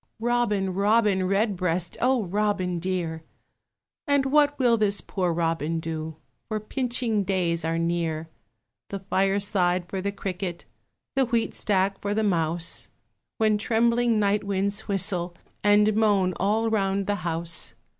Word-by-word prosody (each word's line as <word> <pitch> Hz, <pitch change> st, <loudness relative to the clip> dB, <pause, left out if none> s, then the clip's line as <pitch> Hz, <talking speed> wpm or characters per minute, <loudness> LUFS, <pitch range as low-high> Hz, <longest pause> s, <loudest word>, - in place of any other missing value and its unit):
Robin, 225 Hz, -5 st, 0 dB
Robin 200 Hz, -1 st, +2 dB
Redbreast, 185 Hz, -4 st, 0 dB
O 255 Hz, -2 st, +2 dB
Robin 190 Hz, -2 st, -1 dB
dear! 170 Hz, -3 st, -2 dB, 0.9 s
And 285 Hz, -1 st, +3 dB
what 290 Hz, +1 st, +3 dB
will 245 Hz, -3 st, +4 dB
this 205 Hz, -2 st, +1 dB
poor 180 Hz, -3 st, -2 dB
Robin 165 Hz, -1 st, -1 dB
do? 160 Hz, -1 st, -5 dB, 0.3 s
For 215 Hz, -1 st, -2 dB
pinching 235 Hz, -2 st, -1 dB
days 175 Hz, -4 st, 0 dB
are 165 Hz, 0 st, -1 dB
near. 165 Hz, -1 st, -1 dB, 0.6 s
The 200 Hz, -, -3 dB
fireside 190 Hz, -2 st, +1 dB
for 190 Hz, +1 st, -4 dB
the 200 Hz, +1 st, -1 dB
cricket, 185 Hz, -3 st, -5 dB, 0.5 s
The 265 Hz, -2 st, +2 dB
wheatstack 205 Hz, -5 st, 0 dB
for 205 Hz, 0 st, -1 dB
the 220 Hz, -, +1 dB
mouse, 165 Hz, -3 st, 0 dB, 0.5 s
When 215 Hz, -1 st, +2 dB
trembling 235 Hz, +1 st, +2 dB
night 205 Hz, 0 st, +2 dB
winds 200 Hz, +1 st, -2 dB
whistle 185 Hz, -3 st, 0 dB, 0.3 s
And 210 Hz, +1 st, +4 dB
moan 205 Hz, -4 st, +3 dB
all 220 Hz, +4 st, +1 dB
round 195 Hz, -2 st, 0 dB
the 205 Hz, +1 st, 0 dB
house. 165 Hz, -7 st, -3 dB
195 Hz, 130 wpm, -25 LUFS, 175-215 Hz, 0.9 s, will